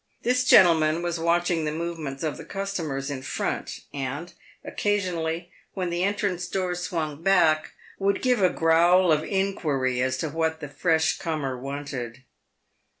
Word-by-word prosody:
This 250 +1 +2
gentleman 165 -6 +5
was 170 -1 -2
watching 170 0 +1
the 150 - -1
movements 160 -4 -4
of 155 -2 -2
the - - -8
customers 165 -9 -4
in 135 -2 -4
front, 130 - -3
and, 140 +5 -4 0.3
occasionally, 175 -4 -1 0.2
when 180 -3 -2
the 175 +1 -1
entrance 200 -3 -1
door 185 -2 -1
swung 165 -4 -3
back, 165 -4 +3 0.3
would 200 0 0
give 250 -4 +2
a 185 - +5
growl 170 +2 +4
of 155 0 +3
inquiry 150 -11 0
as 130 0 0
to 160 - -2
what 160 0 -1
the 145 -3 -7
fresh 160 +2 +1
comer 155 -7 -2
wanted. 135 -2 -6
165 Hz, 150 wpm, -25 LUFS, 150-180 Hz, 0.3 s, gentleman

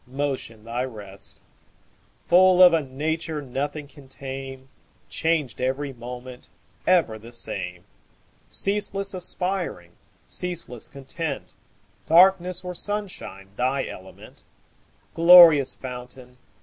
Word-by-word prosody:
Motion 130 -5 -4
thy 120 +2 -3
rest; 105 -6 -7 0.8
Full 185 +1 +6
of 180 -1 +8
a 165 - +3
nature 155 +3 -3
Nothing 145 +2 -4
can 145 -1 -16
tame, 135 0 -8 0.4
Changed 155 -8 -1
every 135 +2 -2
moment, 125 +1 -9 0.4
Ever 160 -12 +2
the 115 +2 -13
same; 120 - -4 0.6
Ceaseless 200 -1 0
aspiring, 180 - -3 0.3
Ceaseless 170 -10 -4
content, 140 - -6 0.5
Darkness 180 +2 +4
or 180 0 -5
sunshine 185 - -4
Thy 130 +2 0
element; 95 +1 -12 0.7
Glorious 165 -4 +8
fountain. 125 0 -9
140 Hz, 95 wpm, -24 LUFS, 125-175 Hz, 0.8 s, of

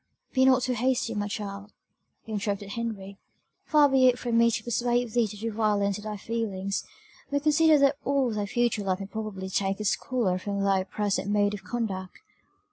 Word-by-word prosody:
"Be 260 -1 +4
not 260 -1 +5
too 255 - 0
hasty, 245 -1 0
my 205 -1 -2
child," 200 0 -6 0.5
interrupted 205 -2 -3
Henry; 200 -3 -5 0.5
"far 300 -2 +5
be 265 -2 +4
it 250 -1 +4
from 240 -2 -2
me 235 0 +5
to 230 - -2
persuade 240 0 0
thee 235 0 +2
to 210 - -9
do 225 +2 -3
violence 205 -2 +1
to - - -9
thy 210 0 -5
feelings 200 -3 -3 0.5
but 285 0 -1
consider 310 0 +5
that 280 0 +3
all 275 -3 +1
thy 210 -1 -2
future 235 -1 0
life 190 -1 -1
may 195 - -5
probably 205 -2 -5
take 195 +1 -1
its 210 - +1
colour 220 -8 -1
from 200 +1 -3
thy 195 -1 +2
present 205 0 -1
mode 205 0 +2
of 205 - -7
conduct. 195 -6 -4
215 Hz, 190 wpm, -27 LUFS, 200-245 Hz, 0.5 s, not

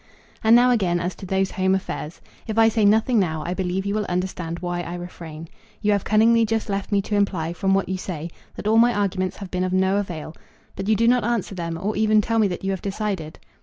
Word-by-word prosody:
And 220 +1 +6
now 245 +1 +6
again 185 -7 +1
as 180 +1 -2
to 190 - -8
those 190 +1 0
home 190 0 +1
affairs. 170 -4 -5 0.3
If 220 0 -3
I 225 0 +6
say 220 -1 +1
nothing 220 +3 +4
now 160 -5 -1
I 175 - -2
believe 190 +1 -2
you 200 - -1
will 210 0 -1
understand 180 -2 -3
why 175 0 -3
I 175 0 -5
refrain. 165 -2 -8 0.3
You 210 - +1
have 200 -2 +1
cunningly 225 +2 +4
just 225 0 -1
left 195 0 -3
me 200 -1 +2
to 210 - -2
imply, 180 -5 0
from 195 +2 +1
what 195 - 0
you 190 - -2
say, 170 -3 -5 0.2
that - - -8
all 220 +1 +5
my 240 0 +4
arguments 190 -2 -1
have 195 -3 -8
been 185 0 -1
of 185 0 -1
no 190 +1 +2
avail; 170 -6 -4 0.4
but 195 +2 -4
you 220 - +5
do 230 +2 +2
not 245 0 +4
answer 230 -3 -1
them, 170 -2 -4
or 205 +4 -2
even 215 0 +3
tell 225 +2 +1
me 215 - +4
that 180 -1 -5
you 195 - 0
have 190 - -3
decided. 195 -6 -3
195 Hz, 245 wpm, -23 LUFS, 180-215 Hz, 0.4 s, And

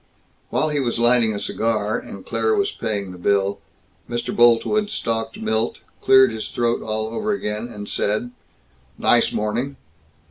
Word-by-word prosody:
While 155 - +1
he 150 -1 0
was 120 -4 -1
lighting 120 -1 +4
a 105 - -3
cigar, 110 0 -1
and - - -10
Claire 440 0 +1
was 400 -1 +1
paying 100 -4 -3
the 90 - -11
bill, 100 +1 +1 0.5
Mr. 120 0 -3
Boltwood 120 - +4
stalked 115 - -2
Milt, 110 +1 -1 0.2
cleared 130 -1 +6
his 110 -1 -5
throat 120 -1 0
all 110 0 -2
over 210 - -1
again, 105 - -3
and 105 -2 -8
said, 110 +4 -1 0.7
"Nice - - +3
morning." 120 +6 -2
115 Hz, 150 wpm, -22 LUFS, 105-125 Hz, 0.7 s, cleared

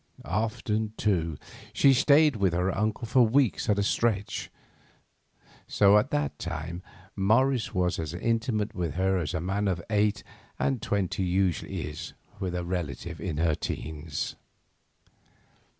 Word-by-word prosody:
Often, 110 - -1
too, 85 -7 0 0.4
she 140 - +5
stayed 145 +2 +5
with 95 -4 +2
her 90 +2 0
uncle 110 +3 -1
for 125 +3 +3
weeks 120 0 +2
at 105 - +3
a 100 - +2
stretch, 105 -1 0 1.2
so 100 0 +5
at 130 - -2
that 145 0 -1
time 85 +1 -5 0.3
Morris 115 +4 +2
was 90 0 +1
as 80 -2 -3
intimate 115 +1 -1
with 85 -4 -3
her 95 +1 +2
as 80 0 -3
a - - 0
man 100 +4 -1
of 90 -3 0
eight 105 0 +2 0.3
and 135 -5 0
twenty 100 -2 -1
usually 90 -1 0
is - - -6 0.3
with 90 -3 -3
a 90 -1 -2
relative 85 -2 -4
in 85 -5 -3
her 80 0 +2
teens. 75 0 -4
100 Hz, 140 wpm, -28 LUFS, 85-110 Hz, 1.2 s, she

